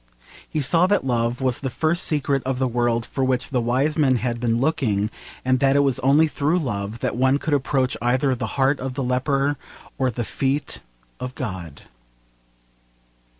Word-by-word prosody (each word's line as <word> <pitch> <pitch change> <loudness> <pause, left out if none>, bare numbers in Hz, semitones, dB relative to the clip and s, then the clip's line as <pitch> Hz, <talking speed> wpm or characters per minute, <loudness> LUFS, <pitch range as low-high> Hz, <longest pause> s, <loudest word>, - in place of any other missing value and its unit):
He 155 - -1
saw 165 +6 +4
that 205 -8 +1
love 120 0 0
was 130 -2 +1
the 135 - -3
first 160 +7 +1
secret 140 -3 +1
of 130 0 -2
the 130 0 +1
world 120 -1 0
for 135 - -3
which 130 0 0
the 125 -2 +1
wise 135 +7 0
men 135 -4 +4
had 120 0 -2
been 115 -1 +1
looking, 115 -8 0 0.3
and 130 0 +2
that 135 0 +3
it 140 - +5
was 135 -3 +1
only 145 +5 +4
through 150 +3 0
love 110 - -3
that - - -1
one 130 +3 +3
could 150 +1 -2
approach 135 -1 +1
either 130 +3 +2
the 120 -3 -3
heart 135 +1 +2
of 130 0 -4
the 135 - -2
leper 135 +3 0 0.4
or 130 -1 +2
the 120 0 -3
feet 135 +5 -2 0.4
of 125 0 -6
God. 95 - -6
130 Hz, 185 wpm, -22 LUFS, 120-140 Hz, 0.4 s, it